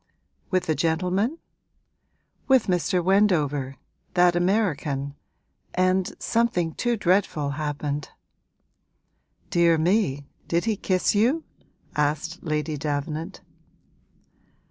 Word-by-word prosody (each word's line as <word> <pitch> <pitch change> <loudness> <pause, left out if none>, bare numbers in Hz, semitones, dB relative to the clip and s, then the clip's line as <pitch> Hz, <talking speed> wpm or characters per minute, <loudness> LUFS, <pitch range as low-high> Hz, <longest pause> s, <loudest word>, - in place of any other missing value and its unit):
'With 185 -1 0
a 160 - +2
gentleman?' 180 - 0 1.1
'With 265 -3 +4
Mr. 180 -1 +1
Wendover 150 -9 +2 0.4
that 175 -1 +5
American, 165 -7 0 0.6
and 185 +1 +1
something 215 -8 0
too 240 -1 0
dreadful 180 -7 +1
happened.' 145 -1 -3 1.4
'Dear 170 -1 +4
me, 160 -5 +1 0.2
did 170 +3 0
he 225 -2 +1
kiss 185 -2 +1
you?' 245 +10 +2 0.5
asked 150 +4 -1
Lady 155 -1 -2
Davenant. 150 +2 -3
175 Hz, 90 wpm, -25 LUFS, 150-195 Hz, 1.4 s, that